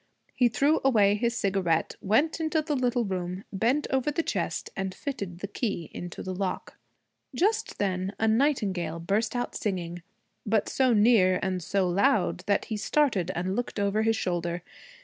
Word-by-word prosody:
He 250 - +4
threw 285 +7 +2
away 210 -7 +4
his 235 +3 0
cigarette, 190 -6 0
went 275 +12 +2
into 315 -1 0
the 300 -1 -1
little 245 -2 +1
room, 185 0 -3
bent 240 +9 +1
over 265 +1 +1
the 325 +3 -1
chest, - - -2
and 190 -1 -3
fitted 195 -11 -5
the 200 - -3
key 200 - -3
into 175 0 -7
the 185 - -4
lock. 185 0 -3 0.6
Just 410 - 0
then 185 -1 -1
a 220 - +1
nightingale 210 - +1
burst 210 +7 0
out 245 - -2
singing, 175 -4 -3 0.4
but 215 -1 +1
so 260 -2 +2
near 205 -4 +5
and 185 -1 -1
so 190 +2 0
loud 195 +1 +2
that 200 - +2
he 220 - -3
started 215 - +1
and 185 +2 -1
looked 245 -2 -3
over 200 +1 +1
his 225 0 +2
shoulder. 175 -3 -2
205 Hz, 170 wpm, -27 LUFS, 185-245 Hz, 0.6 s, near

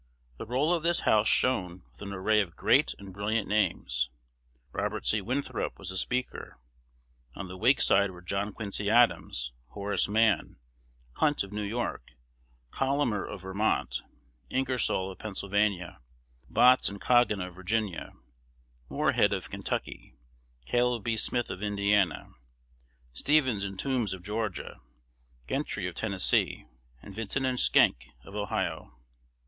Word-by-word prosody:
The - - -6
roll 135 +8 +2
of 170 - +1
this 170 +1 +1
House 110 0 +3
shone 90 -8 +1
with - - -20
an 100 -1 -6
array 105 +3 +2
of 90 -5 -5
great - - +3
and 100 -1 -11
brilliant 105 +2 -1
names. 70 - 0 0.6
Robert 105 +2 -3
C. 105 - +2
Winthrop 130 +8 -2
was 95 -1 -7
the 95 - -5
Speaker. 125 - -2 0.8
On 100 - -6
the 90 - -8
Whig 125 +8 +4
side 100 +1 +4
were 90 -1 -12
John 100 +3 -2
Quincy 100 0 -3
Adams, 110 - +2
Horace 100 +9 -1
Mann, 110 0 +2 0.6
Hunt 150 -6 +2
of 100 +1 -9
New 105 - -2
York, 105 - -3 0.6
Collamer 135 -7 0
of 100 -2 -8
Vermont, 95 - 0 0.5
Ingersoll 125 -7 0
of 95 - -12
Pennsylvania, 100 - -1 0.5
Botts 125 - +5
and 100 0 -8
Goggin 120 -4 +3
of 90 -1 -5
Virginia, 95 0 -2 0.8
Morehead - - +2
of - - -3
Kentucky, - - -4 0.5
Caleb 120 - +1
B. 115 +1 0
Smith 120 +2 0
of 90 - -6
Indiana, 100 -2 +1 0.8
Stephens 130 - +2
and 95 -1 -5
Toombs 125 -8 0
of 90 - -13
Georgia, 105 -1 -3 0.7
Gentry - - -2
of - - -3
Tennessee, - - +1 0.4
and 100 - -10
Vinton 115 +6 -2
and 130 -1 0
Schenck 65 +2 +4 0.2
of 100 - -13
Ohio. 100 -11 -3
105 Hz, 135 wpm, -29 LUFS, 95-120 Hz, 0.8 s, Botts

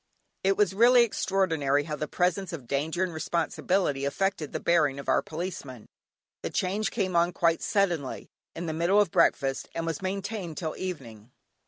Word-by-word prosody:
It 195 0 +2
was 205 -3 +3
really 240 +4 +6
extraordinary 165 -10 +1
how 150 0 -4
the 150 0 -4
presence 180 +4 0
of 145 -7 -6
danger 155 +8 -1
and 180 -2 -2
responsibility 160 -1 0
affected 160 +1 -1
the - - -3
bearing 155 -5 +2
of 140 - -9
our - - +3
Policeman. 155 - -6 0.6
The - - -3
change 200 +4 -1
came 190 -5 -2
on 170 +1 +3
quite 165 -1 +2
suddenly, 175 -9 0 0.3
in 170 - -4
the 160 - -2
middle 170 +6 +3
of 205 -5 +2
breakfast, 135 -2 +2
and 165 0 -2
was 165 -3 -3
maintained 190 -3 -4
till 160 -3 -3
evening. 120 - -7
170 Hz, 170 wpm, -27 LUFS, 150-190 Hz, 0.6 s, really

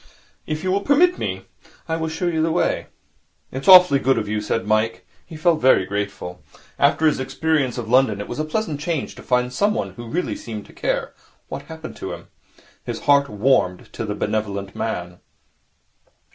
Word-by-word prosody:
If 155 0 -3
you 185 - 0
will 200 +1 +1
permit 340 - +3
me, - - -3 0.4
I 160 - -1
will 160 0 -2
show 160 +3 -3
you 165 -2 +1
the 165 +1 +1
way.' 175 - 0 0.6
'It's 130 +1 -6
awfully 180 -7 +9
good 135 0 +2
of 105 - -1
you,' 105 0 -1
said 115 +2 -2
Mike. 110 +1 0 0.2
He 165 - -10
felt 160 0 +2
very 130 -7 +5
grateful. 100 -3 -4 0.4
After 145 +3 +3
his 155 - +3
experience 135 0 0
of 120 -2 -4
London, 120 -4 +3
it 105 - -5
was 120 - -6
a - - +1
pleasant 155 -1 -2
change 160 -1 -2
to - - -12
find 125 0 0
someone 205 - 0
who 120 -1 -10
really 175 +7 -2
seemed 110 -3 -7
to - - -17
care - - -2 0.4
what 140 - -6
happened 160 -1 -8
to - - -5
him. - - -11 0.5
His - - -5
heart 140 -1 +4
warmed 105 -4 +1
to - - -4
the 105 -2 -3
benevolent 100 -2 -3
man. 90 -5 -4
135 Hz, 185 wpm, -22 LUFS, 110-160 Hz, 0.6 s, awfully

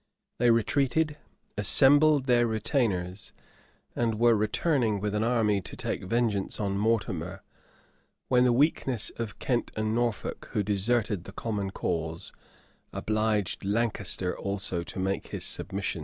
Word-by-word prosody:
They 120 0 +4
retreated, 140 +6 +2 0.4
assembled 145 +6 +5
their 120 -2 +3
retainers, 105 -5 -1 0.6
and 115 -2 0
were 120 0 +5
returning 110 +1 +1
with 105 +1 -2
an 105 +1 0
army 110 -4 +2
to - - -9
take - - -3
vengeance 110 -1 -1
on 100 -2 -1
Mortimer; 100 -4 -1 0.8
when 125 -1 +4
the 125 - +4
weakness 130 -3 +1
of 115 -3 -5
Kent 120 -3 -1
and 110 0 -1
Norfolk, 120 -3 -2
who 105 - +1
deserted 105 -1 0
the - - -9
common 105 -4 -3
cause, 80 -3 -3 0.6
obliged 110 -3 -1
Lancaster 100 -3 -1
also 95 -3 -3
to 85 - -9
make 95 +1 -2
his - - -5
submissions. 95 -3 -3
110 Hz, 130 wpm, -28 LUFS, 100-120 Hz, 0.8 s, assembled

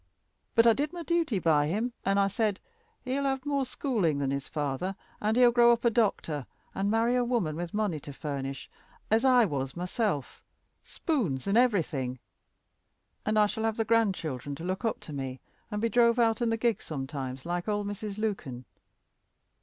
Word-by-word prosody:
But 230 - +6
I 230 - +7
did 295 +7 -2
my 345 -1 -5
duty 330 - +1
by 155 -4 +3
him, 220 +9 -1
and 195 +1 +2
I 200 - +4
said, 205 0 0 0.5
he'll 270 +2 -1
have 270 0 -1
more 280 -2 0
schooling 215 - 0
than 140 -1 -1
his 140 0 -3
father, 150 +6 -2 0.3
and 215 +2 +1
he'll 245 -1 +7
grow 240 0 +6
up 235 +1 +1
a 235 - +5
doctor, 180 - 0 0.3
and 195 +1 -1
marry 225 +3 +2
a 250 - +3
woman 230 -11 0
with 170 +1 -4
money 205 -7 -1
to 145 - -9
furnish 140 -1 -5 0.4
as 225 +2 +4
I 250 -3 +6
was 135 -4 -3
myself, 180 - -2 0.4
spoons 210 - -2
and 200 - +1
everything 160 - +2 1.1
and 215 0 +2
I 210 - +6
shall 220 +2 -3
have 225 -1 0
the 225 - 0
grandchildren 175 - 0
to 165 - -9
look 185 +5 -3
up 225 - -1
to 155 - -9
me, 130 -2 -4 0.3
and 210 -2 -3
be 230 - +1
drove 235 0 +4
out 230 0 +2
in 235 - +2
the 225 - +1
gig 230 -2 +1
sometimes, 135 -3 -5
like 175 +2 -2
old 205 -1 0
Mrs. 205 0 -5
Lukyn. 160 - -3
205 Hz, 185 wpm, -29 LUFS, 150-235 Hz, 1.1 s, I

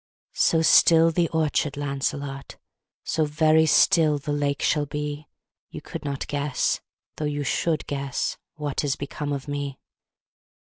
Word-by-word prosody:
So 165 -1 +2
still 165 0 +6
the 170 0 +1
orchard, 155 -2 0
Lancelot, 140 0 -4 0.5
So 160 - 0
very 155 +1 +3
still 155 -1 +4
the 145 +1 -4
lake 145 -1 -1
shall 150 -1 +1
be, 150 +1 -5 0.4
You - - -8
could 165 - -8
not 140 -2 -3
guess 145 -1 -1 0.4
though 155 - -2
you 145 0 -2
should 155 +2 0
guess 140 -2 -2 0.2
What 150 -2 -3
is 140 -2 0
become 145 +1 -5
of 140 0 -4
me. 145 -2 -4
145 Hz, 140 wpm, -24 LUFS, 140-155 Hz, 0.5 s, still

